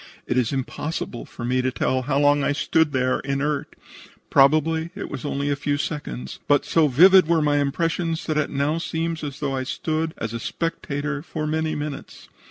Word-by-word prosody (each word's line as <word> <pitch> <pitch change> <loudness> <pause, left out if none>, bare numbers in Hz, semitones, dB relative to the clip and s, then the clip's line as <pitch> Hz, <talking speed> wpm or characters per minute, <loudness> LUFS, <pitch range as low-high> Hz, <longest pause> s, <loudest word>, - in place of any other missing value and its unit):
It - - -1
is 125 -3 +1
impossible 135 -1 -4
for 120 - -8
me 125 +1 +1
to 130 - +1
tell 130 +1 0
how 135 +2 -1
long 145 0 +4
I 145 - +2
stood 160 +1 +2
there 130 -1 +1
inert. 140 +1 -2 0.6
Probably 155 +4 +4
it 205 - -6
was 140 -2 -6
only 145 0 -1
a - - +1
few 145 0 -1
seconds, 65 - -5
but 145 -1 +3
so 160 -2 +3
vivid 180 +6 +7
were 170 -1 +3
my 145 -1 +2
impressions 165 +3 -1
that 155 - -1
it 150 -1 +1
now 145 +3 0
seems 165 -1 -3
as 140 -3 -5
though 140 -2 -1
I 130 - -1
stood 160 +4 -2
as 115 0 -4
a 115 - -3
spectator 150 0 -3
for 155 -1 -5
many 155 +1 -1
minutes. 145 -1 -7
145 Hz, 190 wpm, -23 LUFS, 135-160 Hz, 0.6 s, vivid